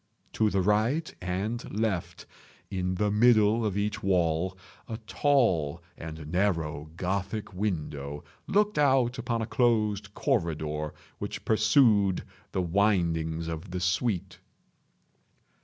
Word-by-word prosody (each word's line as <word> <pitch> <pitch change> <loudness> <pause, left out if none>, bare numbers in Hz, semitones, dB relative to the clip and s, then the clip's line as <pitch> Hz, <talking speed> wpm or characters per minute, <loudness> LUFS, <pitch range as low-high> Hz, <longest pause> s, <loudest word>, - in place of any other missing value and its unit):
To 110 -1 +2
the 95 -2 +1
right 110 - +1
and 100 +5 -3
left, 105 -6 -2 0.5
in 90 -1 -1
the 105 +3 +1
middle 110 0 +4
of 105 -2 -1
each 105 +1 -1
wall, 90 -1 +1 0.3
a 110 - -4
tall 90 - +2
and 80 -2 -8
narrow 80 -6 0
Gothic 100 +4 -2
window 75 -7 -3 0.2
looked 210 -3 +2
out 130 -3 +3
upon 115 -1 -1
a - - -2
closed 105 -4 +1
corridor 75 -2 -1 0.2
which - - -5
pursued 110 -3 +4 0.3
the 95 - 0
windings 85 -4 +1
of 80 +3 -5
the 90 +1 -3
suite. 90 +2 -1
100 Hz, 115 wpm, -28 LUFS, 85-110 Hz, 0.5 s, middle